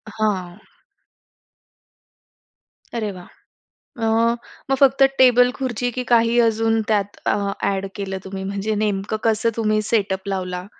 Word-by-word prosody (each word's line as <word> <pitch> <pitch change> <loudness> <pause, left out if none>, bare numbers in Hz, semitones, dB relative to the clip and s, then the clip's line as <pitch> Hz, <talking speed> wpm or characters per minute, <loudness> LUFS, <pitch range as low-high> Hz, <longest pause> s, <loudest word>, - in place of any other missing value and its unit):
हां. 195 -4 -1 2.4
अरे 215 -3 -2
वाह! 180 -2 -11 0.5
अ, 230 -4 -6 0.6
मग - - +4
फक्त 275 0 +5 0.2
टेबल-खुर्ची, 250 -1 +3
की - - -1
काही 235 0 +4
अजून 225 0 +1
त्यात 205 -2 0
अ, - - +2 0.3
ॲड 195 0 -1
केलं 195 -1 -4
तुम्ही 190 0 -6
म्हणजे 200 +2 -2
नेमकं 205 0 -1
कसं 225 +1 +2
तुम्ही 215 -1 +1
सेटअप 195 -3 0
लावला? 180 -2 -3
215 Hz, 115 wpm, -21 LUFS, 195-230 Hz, 2.4 s, फक्त